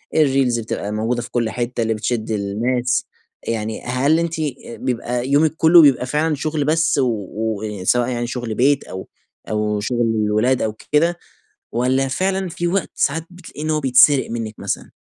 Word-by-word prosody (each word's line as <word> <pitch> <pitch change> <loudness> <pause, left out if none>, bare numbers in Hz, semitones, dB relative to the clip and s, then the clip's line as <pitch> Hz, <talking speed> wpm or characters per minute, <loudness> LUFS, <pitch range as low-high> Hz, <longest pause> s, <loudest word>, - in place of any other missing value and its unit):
الريلز 135 -5 +3
بتبقى 105 -2 -4
موجودة 115 +3 -1
في 120 - -8
كل 115 -2 0
حتة، 120 +1 -3
اللي 110 0 0
بتشد 110 0 -2
الناس. 120 +5 0 0.4
يعني 110 -1 -3
هل 135 +6 +1
أنتِ 170 -1 -2 0.5
بيبقى 125 0 -2
يومِك 150 +3 +3
كلُّه 165 +2 +7
بيبقى 135 -4 +4
فعلًا 150 +4 0
شُغل 150 0 -2
بس 160 0 +2
و 130 -3 +2 0.3
و 105 -2 -3
سواء 120 +5 +2
يعني 120 -1 -2
شُغل 120 -2 -4
بيت 140 +4 +3
أو 95 - -8 0.4
أو 105 -1 0
شُغل 120 +3 -1 0.2
الولاد 110 +5 +1
أو 110 - -1 0.2
كده، 170 +4 +3 0.5
والّا 130 +3 +1
فعلًا 190 +6 -1
في 175 +1 -3
وقت 190 +2 -1
ساعات 160 +3 0
بتلاقي 175 -4 -11
إن 155 - -2
هو 155 -1 +1
بيتسرق 135 0 +5
منِّك 115 -2 -4
مثلًا؟ - - -4
125 Hz, 170 wpm, -20 LUFS, 110-150 Hz, 0.5 s, كلُّه